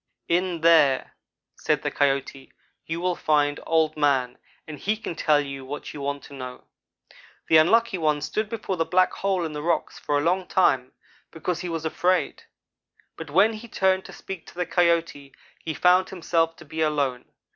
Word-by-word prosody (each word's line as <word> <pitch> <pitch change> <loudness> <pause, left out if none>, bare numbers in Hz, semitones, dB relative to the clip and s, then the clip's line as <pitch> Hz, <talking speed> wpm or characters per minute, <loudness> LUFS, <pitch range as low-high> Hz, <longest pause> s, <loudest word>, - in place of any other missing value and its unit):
"'In 175 -1 0
there,' 155 -5 +4 0.4
said - - 0
the - - -1
Coyote, 135 -1 -1 0.4
'you 165 +1 -3
will 180 0 0
find 145 -2 +1
Old 160 -1 +2
man 135 -4 +1 0.3
and 150 -2 -8
he 215 +2 -1
can 210 - -5
tell 155 -2 +2
you 140 -2 -5
what 140 +3 -7
you 145 - -7
want 140 0 -3
to - - -13
know.' 130 -2 -8 0.9
"The 160 - +7
Unlucky 210 +5 +3
one 155 -2 +1
stood 215 +7 -2
before 215 -4 -4
the 165 - +2
black 185 +2 +2
hole 190 -3 -1
in 155 - -5
the 150 - -5
rocks 170 +2 -1
for 145 - 0
a - - +1
long 180 +2 0
time, 130 -9 +2 0.4
because 170 +2 -3
he 180 - -5
was 165 -1 -4
afraid; 180 +3 0 0.7
but 160 -2 -8
when 195 +9 +4
he 220 +2 -9
turned 190 -3 +1
to - - -10
speak 190 -4 -9
to - - -14
the 180 0 -1
Coyote 170 -6 0 0.3
he 160 - -3
found 180 +1 +4
himself 165 -2 0
to - - -14
be 160 +2 -5
alone. 140 -5 0
165 Hz, 185 wpm, -25 LUFS, 145-180 Hz, 0.9 s, The